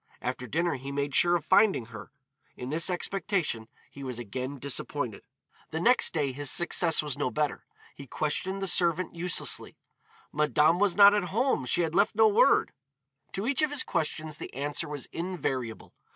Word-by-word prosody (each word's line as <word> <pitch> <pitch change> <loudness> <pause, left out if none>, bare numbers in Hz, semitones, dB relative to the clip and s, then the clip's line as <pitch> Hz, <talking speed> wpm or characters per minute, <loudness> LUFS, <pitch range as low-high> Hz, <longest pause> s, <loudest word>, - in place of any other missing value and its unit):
After 125 0 -4
dinner 170 0 -1
he 135 +2 -7
made 140 0 -2
sure 175 +4 +4
of 165 -3 -2
finding 195 - +4
her. 115 0 -11 0.5
In 125 +2 -6
this 165 +4 0
expectation 180 - -2 0.2
he 140 - -10
was 130 -3 -5
again 130 +4 -5
disappointed. 140 +1 -3 0.5
The 160 - -3
next 245 +8 +3
day 145 -5 -1
his 140 +1 -2
success 170 0 +2
was 145 -3 -3
no - - 0
better. 150 +2 -2 0.3
He 140 - -12
questioned 190 +8 -2
the - - -1
servant 175 -1 +2
uselessly. 175 0 -2 0.6
"Madame 150 +3 +3
was 205 -3 +2
not 200 0 +8
at 205 -3 +1
home, 215 - 0
she 175 - +2
had 160 -1 -2
left 210 +4 +2
no 220 0 +6
word." 210 - +3 0.6
To 195 - -3
each 275 +3 +1
of 305 - +2
his 290 -2 -1
questions 155 -1 -2
the - - -8
answer 145 +4 -3
was 145 -2 -5
invariable. 135 -10 -4
155 Hz, 175 wpm, -28 LUFS, 140-185 Hz, 0.6 s, not